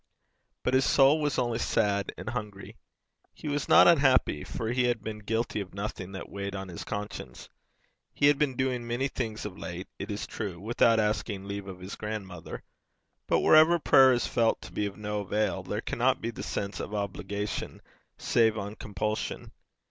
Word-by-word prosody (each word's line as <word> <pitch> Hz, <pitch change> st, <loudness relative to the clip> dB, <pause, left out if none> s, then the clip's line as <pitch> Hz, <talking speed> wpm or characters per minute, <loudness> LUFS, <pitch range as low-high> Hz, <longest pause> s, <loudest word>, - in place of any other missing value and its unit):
But 125 Hz, -, 0 dB
his 130 Hz, +1 st, +4 dB
soul 140 Hz, +4 st, +5 dB
was 145 Hz, -2 st, 0 dB
only 120 Hz, -2 st, 0 dB
sad 100 Hz, -4 st, +1 dB
and -, -, -5 dB
hungry. 105 Hz, -5 st, -6 dB, 0.6 s
He -, -, -8 dB
was 145 Hz, 0 st, -2 dB
not -, -, +8 dB
unhappy, 135 Hz, -, +4 dB
for 110 Hz, 0 st, -4 dB
he 125 Hz, 0 st, +2 dB
had 120 Hz, -3 st, 0 dB
been 110 Hz, -1 st, -5 dB
guilty 110 Hz, 0 st, -1 dB
of 95 Hz, -1 st, -9 dB
nothing 100 Hz, -2 st, -5 dB
that 95 Hz, -, -6 dB
weighed 100 Hz, 0 st, -5 dB
on 95 Hz, -1 st, -5 dB
his 85 Hz, -, -7 dB
conscience. 105 Hz, -1 st, -6 dB, 0.6 s
He 145 Hz, -, +1 dB
had 145 Hz, -1 st, +5 dB
been 140 Hz, -4 st, +1 dB
doing 125 Hz, -2 st, -1 dB
many 120 Hz, +3 st, 0 dB
things 115 Hz, -5 st, -4 dB
of 95 Hz, -2 st, -7 dB
late, 90 Hz, +1 st, -6 dB
it 100 Hz, -, -5 dB
is 105 Hz, 0 st, -3 dB
true, 100 Hz, -6 st, -5 dB
without 115 Hz, +2 st, +3 dB
asking 105 Hz, -2 st, -1 dB
leave 100 Hz, -1 st, -5 dB
of 95 Hz, -1 st, -8 dB
his 95 Hz, +2 st, -6 dB
grandmother, 100 Hz, -5 st, -6 dB, 0.6 s
but -, -, +3 dB
wherever 160 Hz, +2 st, +7 dB
prayer 135 Hz, -4 st, +6 dB
is 120 Hz, -1 st, +1 dB
felt 115 Hz, -1 st, +1 dB
to -, -, -10 dB
be 105 Hz, -, -1 dB
of 100 Hz, -1 st, -9 dB
no 105 Hz, 0 st, -3 dB
avail, 105 Hz, -1 st, -1 dB
there 105 Hz, +4 st, -3 dB
cannot 130 Hz, +3 st, +1 dB
be 115 Hz, -, -3 dB
the -, -, -8 dB
sense 100 Hz, 0 st, -3 dB
of 105 Hz, -, -5 dB
obligation 100 Hz, 0 st, -4 dB, 0.4 s
save 110 Hz, -2 st, +2 dB
on 100 Hz, 0 st, -4 dB
compulsion. 105 Hz, +2 st, -3 dB
105 Hz, 185 wpm, -28 LUFS, 100-125 Hz, 0.6 s, not